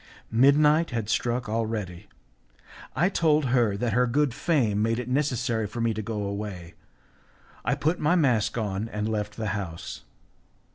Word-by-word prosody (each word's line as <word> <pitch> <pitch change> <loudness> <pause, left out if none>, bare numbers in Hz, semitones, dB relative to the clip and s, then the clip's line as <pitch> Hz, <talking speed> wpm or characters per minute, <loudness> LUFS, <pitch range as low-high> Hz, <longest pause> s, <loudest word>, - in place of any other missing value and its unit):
Midnight 150 +6 +5
had 115 -4 -3
struck 120 +2 0
already; 110 -5 -3 0.9
I 165 +8 +3
told 155 -6 +2
her 120 -5 +2
that 115 0 -1
her 125 +2 +3
good 140 +1 +1
fame 115 - +1
made 115 +1 +1
it 125 -1 -4
necessary 125 -5 0
for 115 +4 -7
me 115 -1 +1
to 110 - -4
go 105 -1 -3
away; 100 -4 -5 0.9
I 140 - +1
put 155 +5 0
my 155 +4 +2
mask 125 - +2
on 105 0 -2
and 105 0 -3
left 105 -1 -3
the 110 -2 -2
house. 90 -5 -6
115 Hz, 155 wpm, -26 LUFS, 105-135 Hz, 0.9 s, Midnight